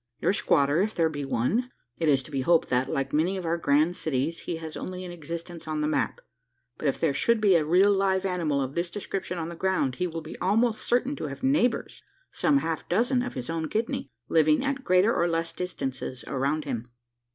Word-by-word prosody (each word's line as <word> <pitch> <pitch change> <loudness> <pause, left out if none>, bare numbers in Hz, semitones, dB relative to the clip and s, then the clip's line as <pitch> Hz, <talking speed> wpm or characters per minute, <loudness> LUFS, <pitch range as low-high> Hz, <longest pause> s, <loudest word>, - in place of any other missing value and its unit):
Your - - +2
squatter, 145 -4 +3
if 215 +2 -1
there 165 -1 +3
be 145 -2 -4
one 135 - 0 0.3
it 165 -2 +2
is 135 -2 +3
to 155 - -13
be 135 -2 -1
hoped 165 +4 +3
that, 125 +1 +1
like 135 0 -2
many 170 +6 +2
of 185 - -5
our 165 +1 +1
grand 155 +4 +3
cities, 155 +2 -1
he 175 - -4
has 160 -1 -7
only 185 0 -5
an 180 - -7
existence 170 0 -7
on 155 -1 -2
the 150 - +1
map 155 - -1 0.6
but 155 - -1
if 135 - 0
there 160 -4 +2
should 235 +11 +2
be 205 -3 +4
a 165 -3 +4
real 180 +6 +4
live 195 -1 +1
animal 165 -7 0
of 130 +1 -5
this 170 +2 -1
description 190 -1 -4
on 165 0 -3
the 170 - -7
ground, 170 -8 0
he 180 - 0
will 165 -1 -5
be 155 - -9
almost 220 +4 +2
certain 250 +4 +1
to - - -3
have 140 - -8
neighbours 265 -3 +1 0.3
some 290 -1 +2
half 165 - -2
dozen 245 +7 +2
of 250 - -4
his 125 -2 -4
own 165 -1 -2
kidney 220 -10 -2 0.2
living 155 - +3
at 275 -1 -2
greater 185 +4 +4
or 170 - +2
less 165 0 -1
distances 135 -8 -4
around 140 +3 -1
him. 125 -4 -4
165 Hz, 220 wpm, -27 LUFS, 150-190 Hz, 0.6 s, be